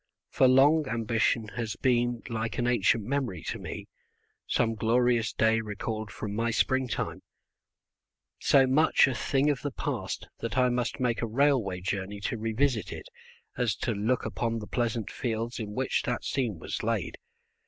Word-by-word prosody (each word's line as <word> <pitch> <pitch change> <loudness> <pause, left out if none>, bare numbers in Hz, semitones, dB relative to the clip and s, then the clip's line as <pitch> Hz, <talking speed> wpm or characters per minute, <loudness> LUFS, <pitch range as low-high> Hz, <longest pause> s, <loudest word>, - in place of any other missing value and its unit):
For 130 - +4
long 140 +4 +5
ambition 115 0 0
has 115 -2 -4
been 120 -2 +1
like 115 -1 -3
an 120 - 0
ancient 115 -2 +2
memory 120 - -2
to - - -4
me, - - -6 0.6
some 115 -1 +1
glorious 115 +1 +2
day 115 0 +2
recalled 110 0 -4
from 100 +2 -5
my 115 +2 0
springtime, 130 +1 0 1.2
so 135 -1 +5
much 140 +4 +4
a 135 - 0
thing 140 +3 +1
of 140 - -3
the 145 - -2
past - - -4
that 115 +2 -4
I 125 -1 +4
must 125 +2 -1
make 120 -3 0
a 115 - -1
railway 115 -7 +1
journey 95 +2 -3
to 115 +2 -2
revisit 115 +1 0
it - - -8 0.5
as 120 -5 +1
to 120 - -2
look 110 +4 0
upon 115 -1 -2
the 110 - -5
pleasant 115 -1 -2
fields 115 0 -3
in 105 -2 -5
which 130 +1 0
that - - -2
scene - - -1
was - - -5
laid. - - -2
115 Hz, 165 wpm, -28 LUFS, 110-130 Hz, 1.2 s, long